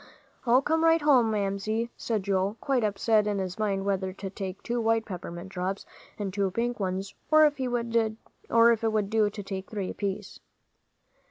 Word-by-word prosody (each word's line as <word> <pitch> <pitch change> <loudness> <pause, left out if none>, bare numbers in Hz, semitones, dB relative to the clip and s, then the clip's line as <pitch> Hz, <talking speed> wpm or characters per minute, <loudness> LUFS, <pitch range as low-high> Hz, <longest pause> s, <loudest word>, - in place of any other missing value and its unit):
"I'll 250 +3 +5
come 320 +3 +1
right 330 0 +5
home, 260 -6 +5
Mamsie," 215 +3 -1
said 220 -4 -2
Joel, 195 +2 0
quite 265 -4 0
upset 210 +1 +2
in 205 -1 0
his 185 0 -4
mind 195 -2 0
whether 190 -1 0
to 195 0 -7
take 190 -1 -6
two 240 0 -1
white 225 0 +2
peppermint 180 -1 -7
drops 190 +1 -3 0.3
and 200 -3 -4
two 200 -1 +1
pink 235 +4 -2
ones, 190 0 -2 0.2
or 310 0 +7
if 290 -2 +1
it 260 -1 -1 1.2
would 215 -2 0
do 220 -2 +3
to 205 0 -7
take 195 0 -6
three 200 -4 -3
apiece. 200 -2 -4
205 Hz, 170 wpm, -28 LUFS, 195-230 Hz, 1.2 s, or